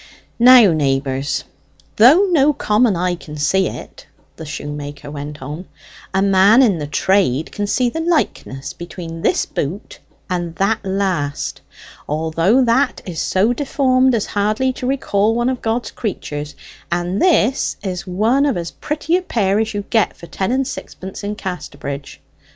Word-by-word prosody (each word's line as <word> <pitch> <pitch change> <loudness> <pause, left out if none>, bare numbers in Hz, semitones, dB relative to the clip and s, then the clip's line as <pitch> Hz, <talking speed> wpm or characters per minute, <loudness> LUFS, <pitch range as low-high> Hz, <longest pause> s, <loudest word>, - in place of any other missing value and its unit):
"Now, 240 -6 +8
neighbours, 135 -2 -1 0.5
though 280 - +7
no 300 -3 +4
common 215 -5 +2
eye 180 +1 0
can 150 -3 -9
see 185 +6 +2
it," - - -9 0.3
the 160 - -9
shoemaker 145 0 -6
went 145 -1 -7
on, 150 +7 -7 0.4
"a 190 0 +1
man 200 +5 +5
in 200 -9 +2
the 145 - -4
trade 160 -3 +1
can 205 -1 -3
see 245 +4 +1
the 280 +7 -3
likeness 305 - -1
between 170 -1 -8
this - - +1
boot 175 +10 -5 0.3
and 175 -3 -3
that 205 +4 0
last, 190 -7 -2 0.5
although 165 - +2
that 245 +4 +1
is 175 -4 -4
so 205 +6 +2
deformed 260 -2 +2
as 215 - -1
hardly 215 +6 0
to 250 - -5
recall 225 -5 +1
one 240 +1 +1
of 255 -2 -3
God's 230 +2 -2
creatures, 150 -8 -5 0.4
and 175 +3 -1
this 280 - +2
is 185 -2 -4
one 225 +10 +2
of 270 - 0
as 170 -1 -4
pretty 305 +2 -2
a - - -2
pair 205 - 0
as 220 -1 -2
you'd 205 -1 -5
get 225 -3 +2
for - - -11
ten 190 +5 -3
and 265 0 0
sixpence 190 -7 -8
in 205 +1 -3
Casterbridge. 140 -8 -6
195 Hz, 155 wpm, -19 LUFS, 165-240 Hz, 0.5 s, Now